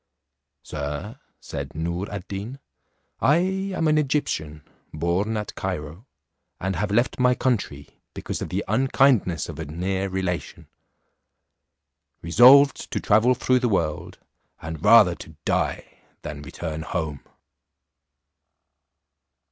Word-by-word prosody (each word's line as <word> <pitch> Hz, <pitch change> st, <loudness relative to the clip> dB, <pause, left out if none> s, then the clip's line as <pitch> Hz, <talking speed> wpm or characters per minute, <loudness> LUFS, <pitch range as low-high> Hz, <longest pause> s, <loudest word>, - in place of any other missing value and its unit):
"Sir," 75 Hz, -, -5 dB, 0.2 s
said -, -, -7 dB
Noor 85 Hz, +4 st, -3 dB
ad 100 Hz, -1 st, -6 dB
Deen, 105 Hz, +7 st, -6 dB, 0.6 s
"I 150 Hz, +4 st, +4 dB
am 190 Hz, -1 st, -1 dB
an 155 Hz, 0 st, +3 dB
Egyptian, 80 Hz, -, -2 dB, 0.3 s
born 90 Hz, +8 st, -1 dB
at 105 Hz, -1 st, -5 dB
Cairo, 90 Hz, -, -5 dB, 0.5 s
and 95 Hz, 0 st, -2 dB
have 105 Hz, +5 st, -1 dB
left 120 Hz, +6 st, +1 dB
my 125 Hz, 0 st, +4 dB
country, 100 Hz, -, -3 dB
because -, -, -5 dB
of -, -, -4 dB
the -, -, -2 dB
unkindness 125 Hz, -, +2 dB
of -, -, -8 dB
a 80 Hz, -, -4 dB
near 95 Hz, +5 st, -2 dB
relation, 95 Hz, -2 st, -4 dB, 1.6 s
resolved 130 Hz, -, +6 dB
to -, -, -2 dB
travel 115 Hz, +4 st, +3 dB
through 130 Hz, +1 st, +2 dB
the 125 Hz, -1 st, 0 dB
world, 80 Hz, -7 st, -2 dB, 0.4 s
and 80 Hz, -1 st, -7 dB
rather 105 Hz, -7 st, +7 dB
to 80 Hz, -1 st, -12 dB
die -, -, -2 dB, 0.2 s
than 75 Hz, -1 st, -6 dB
return 80 Hz, +2 st, -6 dB
home." 80 Hz, -4 st, -4 dB
95 Hz, 115 wpm, -24 LUFS, 80-125 Hz, 1.6 s, rather